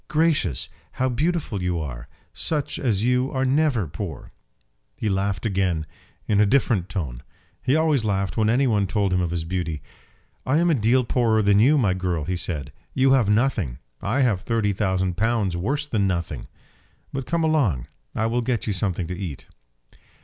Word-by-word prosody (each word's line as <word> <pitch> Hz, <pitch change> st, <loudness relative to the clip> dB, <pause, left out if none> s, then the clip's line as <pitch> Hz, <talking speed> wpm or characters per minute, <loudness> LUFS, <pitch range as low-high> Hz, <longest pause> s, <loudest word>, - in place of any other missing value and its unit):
"Gracious; 150 Hz, -, +1 dB, 0.3 s
how 130 Hz, -, 0 dB
beautiful 145 Hz, -, -1 dB
you 90 Hz, -1 st, 0 dB
are! 65 Hz, -5 st, -6 dB, 0.3 s
Such 150 Hz, -2 st, -2 dB
as 110 Hz, -6 st, 0 dB
you 125 Hz, +2 st, +2 dB
are 130 Hz, 0 st, 0 dB
never 135 Hz, -, +2 dB
poor." 80 Hz, -1 st, -7 dB, 0.7 s
He -, -, -2 dB
laughed 95 Hz, 0 st, -1 dB
again, 95 Hz, -6 st, 0 dB, 0.4 s
in 105 Hz, -1 st, +3 dB
a -, -, +6 dB
different 105 Hz, -6 st, +2 dB
tone. 65 Hz, -11 st, -4 dB, 0.4 s
He 130 Hz, -, +2 dB
always 155 Hz, -6 st, +2 dB
laughed 100 Hz, -2 st, -1 dB
when 110 Hz, -1 st, +2 dB
any 130 Hz, +4 st, +3 dB
one 105 Hz, -5 st, +2 dB
told 100 Hz, -1 st, 0 dB
him 90 Hz, -, +2 dB
of 85 Hz, -, 0 dB
his 85 Hz, -1 st, -2 dB
beauty. 80 Hz, -3 st, -3 dB, 0.6 s
"I 130 Hz, +3 st, +2 dB
am 170 Hz, +1 st, +3 dB
a -, -, +4 dB
deal 125 Hz, 0 st, +3 dB
poorer 115 Hz, -2 st, +2 dB
than 100 Hz, 0 st, +4 dB
you, 140 Hz, +8 st, +5 dB
my 105 Hz, -9 st, +3 dB
girl," 90 Hz, -4 st, -1 dB
he 90 Hz, +4 st, -2 dB
said. 80 Hz, -5 st, -4 dB, 0.2 s
"You 135 Hz, 0 st, +4 dB
have 125 Hz, -6 st, +4 dB
nothing. 105 Hz, -, +1 dB, 0.2 s
I 115 Hz, +8 st, 0 dB
have 110 Hz, -8 st, +2 dB
thirty 110 Hz, -2 st, 0 dB
thousand 95 Hz, -3 st, 0 dB
pounds 110 Hz, -4 st, +1 dB
worse 140 Hz, +12 st, -1 dB
than 105 Hz, -8 st, +1 dB
nothing. 85 Hz, -3 st, -3 dB, 0.7 s
But 135 Hz, -1 st, -4 dB
come 170 Hz, -1 st, 0 dB
along, 130 Hz, -, +2 dB, 0.3 s
and 110 Hz, -, 0 dB
I -, -, +2 dB
will 120 Hz, +2 st, +1 dB
get 120 Hz, -1 st, -1 dB
you 105 Hz, -, 0 dB
something 95 Hz, -2 st, -1 dB
to 90 Hz, -, -4 dB
eat." 90 Hz, -7 st, -6 dB
105 Hz, 185 wpm, -24 LUFS, 90-130 Hz, 0.7 s, a